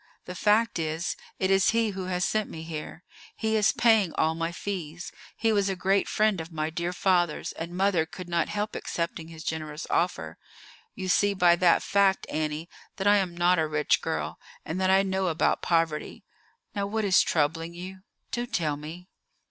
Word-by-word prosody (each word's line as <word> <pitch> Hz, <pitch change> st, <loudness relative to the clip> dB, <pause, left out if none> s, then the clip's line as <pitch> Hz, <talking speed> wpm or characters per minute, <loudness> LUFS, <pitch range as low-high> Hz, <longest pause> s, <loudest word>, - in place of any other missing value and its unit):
The 180 Hz, -, -6 dB
fact 210 Hz, +2 st, +2 dB
is, 160 Hz, +2 st, -2 dB, 0.2 s
it 190 Hz, 0 st, +1 dB
is 195 Hz, -1 st, +4 dB
he 225 Hz, -2 st, +2 dB
who 190 Hz, -1 st, -5 dB
has 180 Hz, -1 st, 0 dB
sent 215 Hz, -1 st, 0 dB
me 160 Hz, -, -7 dB
here. 160 Hz, +1 st, -7 dB, 0.3 s
He 220 Hz, 0 st, 0 dB
is 215 Hz, -1 st, +4 dB
paying 220 Hz, -7 st, +3 dB
all 160 Hz, -, +2 dB
my 165 Hz, +1 st, -2 dB
fees. 175 Hz, -3 st, -5 dB, 0.3 s
He 225 Hz, -, +2 dB
was 200 Hz, -1 st, +2 dB
a 195 Hz, -, -1 dB
great 195 Hz, +2 st, +1 dB
friend 215 Hz, -5 st, +2 dB
of 160 Hz, +1 st, -9 dB
my 155 Hz, 0 st, -2 dB
dear 170 Hz, +2 st, -2 dB
father's, 175 Hz, -3 st, +1 dB
and 170 Hz, +2 st, -6 dB
mother 185 Hz, -4 st, +2 dB
could 180 Hz, +2 st, -9 dB
not 170 Hz, -1 st, 0 dB
help 210 Hz, +1 st, -3 dB
accepting 170 Hz, -1 st, -3 dB
his 160 Hz, -1 st, -10 dB
generous 155 Hz, -1 st, -4 dB
offer. 175 Hz, +2 st, -1 dB, 0.6 s
You 190 Hz, -2 st, -5 dB
see 200 Hz, +2 st, +3 dB
by 175 Hz, -2 st, +5 dB
that 175 Hz, -1 st, +4 dB
fact, 200 Hz, -1 st, +2 dB
Annie, 155 Hz, +1 st, -2 dB, 0.3 s
that 190 Hz, -, -4 dB
I 205 Hz, 0 st, +6 dB
am 180 Hz, -3 st, -1 dB
not 175 Hz, 0 st, +3 dB
a 160 Hz, -, +1 dB
rich 150 Hz, -1 st, +1 dB
girl, -, -, -3 dB, 0.3 s
and 175 Hz, +4 st, -3 dB
that 185 Hz, -, +2 dB
I 190 Hz, +1 st, +5 dB
know 190 Hz, -1 st, 0 dB
about 160 Hz, -2 st, +1 dB
poverty. 165 Hz, -3 st, 0 dB, 0.5 s
Now, 200 Hz, -1 st, -2 dB
what 220 Hz, +1 st, -1 dB
is 190 Hz, -2 st, +5 dB
troubling 165 Hz, +2 st, 0 dB
you? 185 Hz, +2 st, -8 dB, 0.3 s
Do 240 Hz, 0 st, -2 dB
tell 155 Hz, -, -1 dB
me." 165 Hz, +5 st, -9 dB
180 Hz, 190 wpm, -27 LUFS, 165-195 Hz, 0.6 s, I